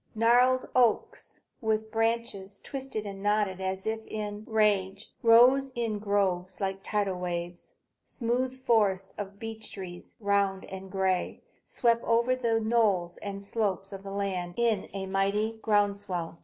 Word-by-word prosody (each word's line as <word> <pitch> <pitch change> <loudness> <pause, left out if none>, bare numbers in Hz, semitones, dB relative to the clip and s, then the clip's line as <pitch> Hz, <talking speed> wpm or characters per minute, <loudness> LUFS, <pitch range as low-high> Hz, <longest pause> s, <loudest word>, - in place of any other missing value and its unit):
Gnarled 245 +3 +4
oaks, 245 -3 +1 0.2
with 220 -1 0
branches 225 -3 -1
twisted 265 -6 -5
and 195 -1 -7
knotted 205 -2 +1
as 190 0 -2
if 220 0 -2
in 210 0 -5
rage, 205 -2 +1
rose 250 +4 +6
in 225 -3 -1
groves 190 -3 0
like 195 -1 -2
tidal 200 -3 -1
waves. 175 -1 -4 0.3
Smooth 250 +2 -1
forests 195 -5 +2
of 200 -1 -6
beech 225 0 -6
trees, 180 -3 -9
round 200 -2 +1
and 190 0 -8
gray, 190 -1 -1 0.2
swept 235 -1 +1
over 235 +2 +2
the 230 -3 +1
knolls 215 -6 +1
and 200 -1 -6
slopes 200 -2 -2
of 195 0 -8
land 195 -3 -3
in 230 -4 +1
a 195 0 -4
mighty 200 +3 0
ground 205 -2 +3
swell. 175 -5 -4
205 Hz, 140 wpm, -29 LUFS, 190-225 Hz, 0.3 s, rose